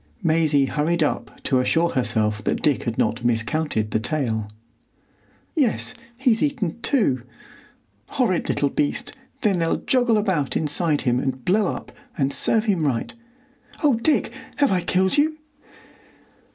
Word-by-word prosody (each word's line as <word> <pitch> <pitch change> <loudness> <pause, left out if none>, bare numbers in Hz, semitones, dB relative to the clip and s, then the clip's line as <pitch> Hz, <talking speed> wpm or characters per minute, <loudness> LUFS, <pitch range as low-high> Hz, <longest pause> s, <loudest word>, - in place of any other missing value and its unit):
Maisie 155 -4 +3
hurried 155 +5 0
up 145 - -3
to 130 - +2
assure 165 +6 +2
herself 105 -4 0
that - - -1
Dick 145 -3 +1
had 115 -1 -3
not 115 +2 0
miscounted 115 -1 0
the - - +1
tale. 115 -4 -2 1.1
"Yes, 260 -5 +1 0.2
he's 250 -4 +2
eaten 255 - -1
two." 200 - +1 0.9
"Horrid 235 -10 0
little 140 - +1
beast! 145 - -1 0.3
Then 195 -4 +2
they'll 165 0 +1
joggle 245 -4 +2
about 185 -10 0
inside 150 0 +2
him 125 -1 +1
and 130 -1 -3
blow 200 +2 +2
up, - - -5 0.3
and 135 -1 +1
serve 220 -1 +2
him 190 -7 +1
right.... 130 -6 -1 0.7
Oh, 290 -3 +5
Dick! 235 +7 +1 0.2
have 285 -5 +2
I 185 -2 +1
killed 190 - +1
you?" 310 +1 +1
160 Hz, 140 wpm, -23 LUFS, 130-215 Hz, 1.1 s, Oh